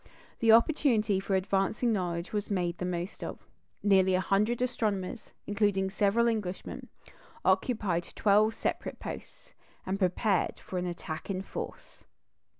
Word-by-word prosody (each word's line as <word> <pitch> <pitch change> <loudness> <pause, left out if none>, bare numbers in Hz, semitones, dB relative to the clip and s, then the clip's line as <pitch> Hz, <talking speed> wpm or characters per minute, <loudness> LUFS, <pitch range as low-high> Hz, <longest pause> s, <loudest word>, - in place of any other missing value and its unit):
The 225 -1 +5
opportunity 230 -5 +4
for 195 0 -1
advancing 195 +5 +1
knowledge 175 -3 -2
was 210 -1 -2
made 175 -4 -1
the 180 - -2
most 175 +2 -4
of. - - -7 0.4
Nearly 190 -2 +4
a - - +2
hundred 210 +5 +1
astronomers, 215 -4 -2
including 200 -2 +1
several 210 +3 +3
Englishmen, 210 -5 -3 0.6
occupied 195 -8 +1
twelve 215 +2 +4
separate - - -3
posts, - - -9 0.3
and 190 +1 -2
prepared 190 +1 +1
for 185 - -4
an 180 - -2
attack 170 -1 -6
in 190 -1 -2
force. - - -8
195 Hz, 135 wpm, -30 LUFS, 185-215 Hz, 0.6 s, The